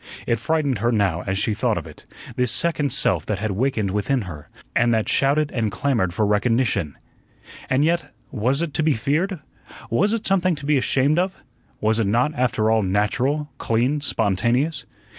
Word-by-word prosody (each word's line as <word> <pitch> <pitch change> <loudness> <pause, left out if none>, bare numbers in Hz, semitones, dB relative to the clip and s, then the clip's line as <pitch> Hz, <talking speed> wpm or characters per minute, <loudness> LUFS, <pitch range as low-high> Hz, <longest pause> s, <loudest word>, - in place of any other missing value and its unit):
It 115 - +1
frightened 145 - 0
her 120 +3 +1
now 100 -6 +1
as 95 0 -1
she 105 +2 +1
thought - - 0
of - - -4
it, - - -13 0.3
this 125 -2 +1
second 150 +1 +2
self - - +1
that 105 - -1
had 110 0 -2
wakened 110 -2 0
within 105 +5 0
her, 75 -6 -9 0.3
and 120 0 +3
that 110 - 0
shouted 145 +2 +2
and 110 -4 -1
clamored 115 -8 0
for 105 +5 0
recognition. 105 - 0 0.7
And 130 +3 +2
yet, 170 +1 0 0.2
was 130 +6 0
it 160 -4 -4
to - - 0
be 155 -1 +2
feared? 155 - -1 0.5
Was 200 - +2
it 230 -1 -2
something 185 -2 +2
to 145 -1 -9
be 150 +1 +2
ashamed 140 +5 +2
of? 185 +1 -1 0.4
Was 110 +1 +2
it 110 - +1
not, 120 +9 +1
after 120 -5 +1
all, 110 0 +3
natural, 125 +10 0
clean, 125 +6 0
spontaneous? 120 - 0
125 Hz, 180 wpm, -22 LUFS, 105-150 Hz, 0.7 s, and